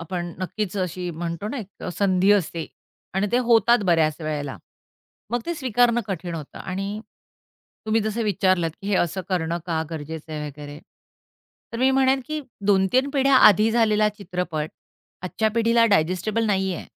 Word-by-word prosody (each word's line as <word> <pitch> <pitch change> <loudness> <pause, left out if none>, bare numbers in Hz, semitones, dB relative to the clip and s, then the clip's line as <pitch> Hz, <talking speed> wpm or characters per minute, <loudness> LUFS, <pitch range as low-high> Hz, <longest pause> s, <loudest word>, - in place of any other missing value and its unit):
आपण 175 0 -4
नक्कीच 195 +1 -3
अशी 180 -1 -3
म्हणतो 170 +4 -4
ना, 280 - -4
एक 215 - -6 0.2
अ, - - -3
संधी 190 -1 +3
असते 170 -4 0 0.5
आणि 195 +2 +1
त्या 245 - +3
होतात 235 0 +4
बऱ्याच 160 -3 +3
वेळेला. 145 -3 -3 0.7
मग 240 +1 0
ते 340 - -1
स्वीकारणं 245 -4 +2
कठीण 175 -3 -4
होतं. 150 -3 -8
आणि 195 +3 -4 0.9
तुम्ही 220 +1 +2
जसं 220 +2 -2
विचारलंत 185 -4 +1
की, 200 - -5
हे 205 - +1
असं 175 +2 0
करणं 170 -2 -1
का 160 -2 0
गरजेचं 160 0 -7
आहे 150 -1 -4
वगैरे? 145 0 -9 0.9
तर - - -4
मी 260 +2 +4
म्हणेन 265 0 +3
की, 310 0 -3 0.3
2-3 205 +7 +3
पिढ्या 275 -1 +3
आधी 215 +2 +5
झालेला 215 -2 +3
चित्रपट 180 -6 -4 0.5
आजच्या 220 +4 0
पिढीला 230 0 +4
डायजेस्टिबल 200 +4 +1
नाहीये. 190 -3 -1
190 Hz, 155 wpm, -23 LUFS, 170-225 Hz, 0.9 s, आधी